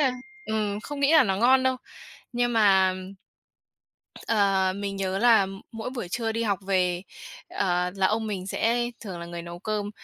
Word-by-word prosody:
là 270 -3 +3 0.3
ừm, 210 -2 -1
không 285 +5 -7
nghĩ 280 +2 +4
là 315 - +8
nó 195 -2 0
ngon 255 +5 +4
đâu. 260 0 +1 0.6
Nhưng 240 0 0
mà, 195 -4 +4 1.3
ờ, 195 -4 +2
mình 200 -1 -4
nhớ 190 0 -2
là 225 -3 +5 0.3
mỗi 225 +2 -5
buổi 240 -8 -5
trưa 225 +4 -2
đi 230 +1 -1
học 200 -4 0
về, 180 -2 +1 0.5
ờ, 180 -1 0
là 195 -1 +2
ông 220 +2 0
mình 195 -3 -4
sẽ 240 +4 0
thường 190 -6 -7
là 170 - -7
người 170 0 -7
nấu 170 0 -8
cơm, 205 +1 -3
205 Hz, 180 wpm, -26 LUFS, 190-230 Hz, 1.3 s, là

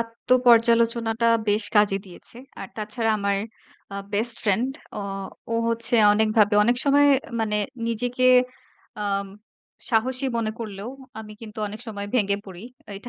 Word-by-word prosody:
আত্ম 230 0 -9 0.2
পর্যালোচনাটা 230 -1 +3 0.2
বেশ 205 +1 +4
কাজে 205 -1 +4
দিয়েছে। 185 +5 -11 0.2
আর 195 - -7
তাছাড়া 220 +1 -2
আমার 200 -1 0 0.5
আ - - -5 0.2
বেস্ট 225 +3 0
ফ্রেন্ড 215 +4 +1 0.3
অ - - -5 0.5
ও - - 0
হচ্ছে 230 +1 -1 0.2
অনেকভাবে 215 0 +2
অনেক 240 +3 +2
সময় 285 0 +4 0.3
মানে 210 -1 0 0.3
নিজেকে 245 +2 -1 0.8
আম 200 -1 -1 0.6
সাহসী 255 +4 0
মনে 220 -2 -1
করলেও 215 0 -7 0.3
আমি 215 -1 -11
কিন্তু 220 -2 -10
অনেক 215 +2 -8
সময় 205 -2 -5
ভেঙে 200 -4 +2
পড়ি। 185 -1 -10 0.3
এইটা 205 +5 -8
220 Hz, 140 wpm, -23 LUFS, 205-235 Hz, 0.8 s, বেশ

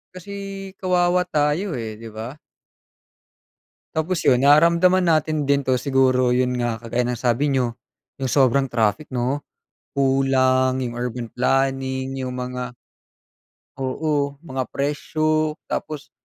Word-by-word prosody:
Kasi, 185 +2 -10 0.4
kawawa 180 -1 +2
tayo, 160 +3 0
eh, 110 -2 -5
'di 115 +1 -10
ba. 110 +5 -7 1.6
Tapos 165 +3 -1
'yon, 125 - +4
naramdaman 170 +5 +5
natin 155 -2 +2
din 140 0 +2
'to, 130 - +3
siguro 130 -1 +2
'yon 125 0 +1
nga, 120 -2 -1
kagaya 120 +2 -1
ng 120 - -4
sabi 130 +4 +1
niyo, 125 -3 0 0.5
'yong 130 - -1
sobrang 135 -1 +3
traffic, 115 +5 0
'no. 130 +3 -1 0.5
Kulang 130 -1 +3
'yong 125 -2 -3
urban 120 0 -4
planning, 135 +1 0
'yong 130 - -3
mga 125 -1 -5 1.0
Oo, 140 +1 -1
mga 130 -5 -4
presyo. 155 +2 0 0.2
Tapos, 150 -3 -4
135 Hz, 120 wpm, -22 LUFS, 125-150 Hz, 1.6 s, naramdaman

